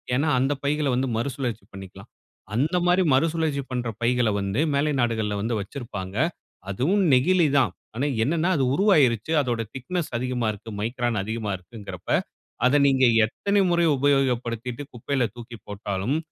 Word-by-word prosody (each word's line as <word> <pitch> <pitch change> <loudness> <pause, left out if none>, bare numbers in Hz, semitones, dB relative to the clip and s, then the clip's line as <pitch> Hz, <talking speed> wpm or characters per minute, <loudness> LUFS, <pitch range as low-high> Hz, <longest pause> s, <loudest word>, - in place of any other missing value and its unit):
ஏன்னா, 145 +4 +1
அந்த 135 +3 +1
பைகள 150 +1 0
வந்து 130 +1 0
மறுசுழற்சி 125 -2 -3
பண்ணிக்கலாம். 95 -1 -11 0.5
அந்தமாரி 175 +7 +2
மறுசுழற்சி 155 -1 +1
பண்ற 125 -2 -2
பைகள 120 -1 +2
வந்து 100 +7 -1
மேலை 145 +2 +1
நாடுகள்ல 110 -3 0
வந்து 115 +2 -1
வச்சிருப்பாங்க. 105 -5 -7 0.5
அதுவும் 165 - +1
நெகிழி 165 +6 +4
தான். 120 -9 +3 0.2
ஆனா, 130 - -1 0.2
என்னன்னா, 165 +6 +1
அது 135 - +1
உருவாயிருச்சு. 150 - +3
அதோட 120 -4 -1
திக்னஸ் 150 +5 -3
அதிகமா 125 -2 -1
இருக்கு. 110 +2 -10
மைக்ரான் 120 -2 -1
அதிகமா 110 0 -3
இருக்குங்கிறப்ப, 100 +3 -10 0.6
அத 145 +3 +4
நீங்க 130 -1 +4 0.2
எத்தனை 200 - 0
முறை 170 -1 +3
உபயோகப்படுத்திட்டு 125 -2 0
குப்பையில 125 +2 -1
தூக்கி 120 -1 -9
போட்டாலும், 100 +5 -2
125 Hz, 135 wpm, -24 LUFS, 115-145 Hz, 0.6 s, நெகிழி